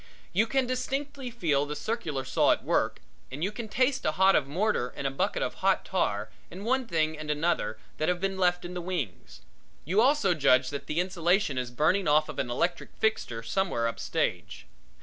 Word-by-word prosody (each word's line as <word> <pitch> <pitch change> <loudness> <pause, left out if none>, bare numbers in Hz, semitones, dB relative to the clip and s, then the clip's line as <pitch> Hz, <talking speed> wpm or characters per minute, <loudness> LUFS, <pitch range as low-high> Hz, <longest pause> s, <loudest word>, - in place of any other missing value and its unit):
You 215 +5 +3
can 265 +2 +1
distinctly 270 +2 -3
feel 155 - 0
the 150 - -4
circular 155 - -3
saw 130 - +4
at - - -5
work - - 0 0.3
and 140 +5 -5
you 195 - 0
can 220 +1 -6
taste 260 +4 +1
a 155 - +1
hod 190 +3 +5
of 140 - +2
mortar 170 - 0
and - - -5
a 135 - +1
bucket 135 - -1
of - - -2
hot - - +2
tar 105 +1 -1 0.2
and 190 +4 -8
one 260 +1 +1
thing 160 -3 0
and 155 0 -7
another 150 -7 0 0.2
that 155 - +1
have 180 0 0
been 195 +1 -1
left 180 -1 +1
in 175 - -6
the 180 - -4
wings. 170 - -5 0.4
You 190 +8 +3
also 260 -7 +4
judge 130 -4 +3
that 140 - -6
the 155 - -1
insulation 180 -3 +1
is 125 -1 -3
burning 160 +10 +1
off 155 +1 +4
of 150 - -6
an 125 - -1
electric 170 +9 -2
fixture 120 - -1
somewhere 145 -7 0
up 115 - -4
stage. - - -2
175 Hz, 205 wpm, -28 LUFS, 145-210 Hz, 0.4 s, hod